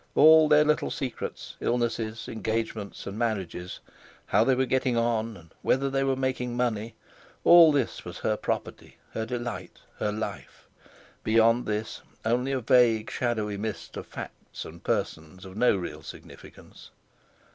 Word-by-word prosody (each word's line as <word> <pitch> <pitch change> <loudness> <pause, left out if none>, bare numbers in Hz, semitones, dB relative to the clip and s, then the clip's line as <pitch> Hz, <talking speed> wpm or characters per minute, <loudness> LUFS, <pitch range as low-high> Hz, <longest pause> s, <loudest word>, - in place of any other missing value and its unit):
All 160 0 +7
their 150 0 +6
little 150 0 +1
secrets, 130 -5 -5
illnesses, 115 -2 -1
engagements, 110 -2 -3
and 100 +2 -6
marriages, 95 -6 -3 0.4
how 110 - +3
they 130 +2 +3
were 130 +1 +2
getting 130 -1 +1
on, 115 -2 0
and 80 -1 -18
whether 135 +1 +1
they 135 0 +1
were 135 -1 +1
making 130 -2 -2
money—all 125 +8 +3
this 140 -5 -1
was - - -8
her - - 0
property, - - -4
her 110 0 -3
delight, 120 0 -5 0.2
her 105 - 0
life; 110 +1 -6 0.6
beyond 115 +2 +3
this 105 +1 -3 0.2
only 125 +4 +1
a 135 -1 -1
vague, 115 -2 +3
shadowy 110 -4 -1
mist 110 +1 -5
of - - -7
facts - - -8
and - - -11
persons 80 +5 -3
of 95 0 -10
no 125 0 +4
real 90 - -6
significance. - - -13
115 Hz, 145 wpm, -27 LUFS, 110-130 Hz, 0.6 s, All